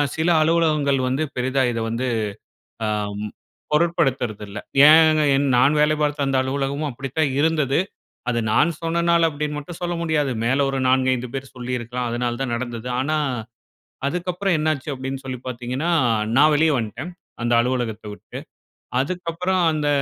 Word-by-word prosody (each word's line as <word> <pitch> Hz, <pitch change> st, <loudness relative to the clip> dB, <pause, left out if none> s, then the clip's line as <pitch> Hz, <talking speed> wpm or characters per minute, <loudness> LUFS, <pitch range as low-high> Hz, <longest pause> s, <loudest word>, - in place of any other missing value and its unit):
சில 160 Hz, +2 st, +1 dB
அலுவலகங்கள் 155 Hz, -4 st, +2 dB
வந்து 135 Hz, +5 st, 0 dB
பெரிதா 130 Hz, +2 st, 0 dB
இத 115 Hz, -, -3 dB
வந்து 120 Hz, +3 st, -2 dB, 0.8 s
அ -, -, 0 dB, 0.3 s
ம் 105 Hz, -, -5 dB, 0.4 s
பொருட்படுத்துறதில்ல. 130 Hz, -, 0 dB, 0.3 s
ஏன் 155 Hz, -3 st, +5 dB
நான் 140 Hz, +5 st, +4 dB
வேலை 155 Hz, +1 st, +3 dB
பாத்த 145 Hz, -1 st, 0 dB
அந்த 135 Hz, -1 st, +1 dB
அலுவலகமும் 140 Hz, +3 st, -2 dB
அப்பிடித்தான் 135 Hz, +3 st, -2 dB
இருந்தது. 150 Hz, -3 st, +2 dB, 0.5 s
அது 120 Hz, -1 st, 0 dB
நான் 150 Hz, +9 st, +3 dB
சொன்னனால 170 Hz, 0 st, +2 dB
அப்டீன்னு 150 Hz, 0 st, -3 dB
மட்டும் 160 Hz, +3 st, -8 dB
சொல்ல 175 Hz, 0 st, -1 dB
முடியாது. 150 Hz, -5 st, 0 dB
மேல 135 Hz, +3 st, +2 dB
ஒரு 135 Hz, -, -2 dB
4,5 130 Hz, -1 st, +2 dB
பேர் 135 Hz, 0 st, -4 dB
சொல்லிருக்கலாம். 125 Hz, 0 st, -3 dB
அதனால 120 Hz, 0 st, -2 dB
தான் 135 Hz, -3 st, -2 dB
நடந்தது. 120 Hz, 0 st, -5 dB
ஆனா, 155 Hz, +4 st, 0 dB, 0.9 s
அதுக்கப்பறம் 180 Hz, +2 st, -1 dB
என்ன 155 Hz, +1 st, +1 dB
ஆச்சு 140 Hz, +3 st, -9 dB
அப்டீன்னு 135 Hz, +1 st, -5 dB
சொல்லி 130 Hz, -1 st, -5 dB
பாத்தீங்கன்னா, 125 Hz, +6 st, -3 dB, 0.5 s
நான் 150 Hz, +2 st, +6 dB
வெளிய 160 Hz, +1 st, +3 dB
வந்டேன். 115 Hz, -, -6 dB, 0.3 s
அந்த 120 Hz, +1 st, 0 dB
அலுவலகத்த 120 Hz, -3 st, -2 dB
விட்டு. -, -, -10 dB, 0.6 s
அதுக்கப்பறம் 180 Hz, +3 st, -1 dB
அந்த 150 Hz, -1 st, -1 dB
140 Hz, 140 wpm, -22 LUFS, 125-155 Hz, 0.9 s, நான்